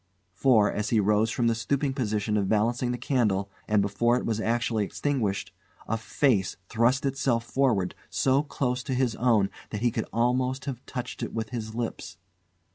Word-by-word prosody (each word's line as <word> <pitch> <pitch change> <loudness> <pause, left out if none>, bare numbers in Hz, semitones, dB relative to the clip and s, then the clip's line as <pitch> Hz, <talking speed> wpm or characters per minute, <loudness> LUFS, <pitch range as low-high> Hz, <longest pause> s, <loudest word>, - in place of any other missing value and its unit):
For, 110 0 +4
as 105 0 -2
he 115 - +3
rose 105 +2 +3
from 120 +2 0
the 115 - +3
stooping 135 +4 -1
position 105 -5 -1
of 100 -2 +1
balancing 120 +3 +1
the 125 - -2
candle, 105 -6 0 0.2
and 105 -2 +3
before 120 +5 +2
it - - -3
was 110 -1 -1
actually 115 -1 0
extinguished, 110 -3 -2 0.3
a 110 - 0
face 110 -2 +1
thrust 120 +4 +2
itself 130 -3 +1
forward 120 -8 +1 0.2
so 135 +1 +2
close 130 -3 -2
to 130 - -1
his 125 -3 +1
own 110 -5 +3 0.2
that 105 - -4
he 120 0 +2
could - - -2
almost 125 +3 0
have 130 -3 -5
touched 125 -2 -5
it - - -4
with 110 -1 -3
his 110 -2 -5
lips. 115 -6 -4
115 Hz, 180 wpm, -27 LUFS, 105-125 Hz, 0.3 s, For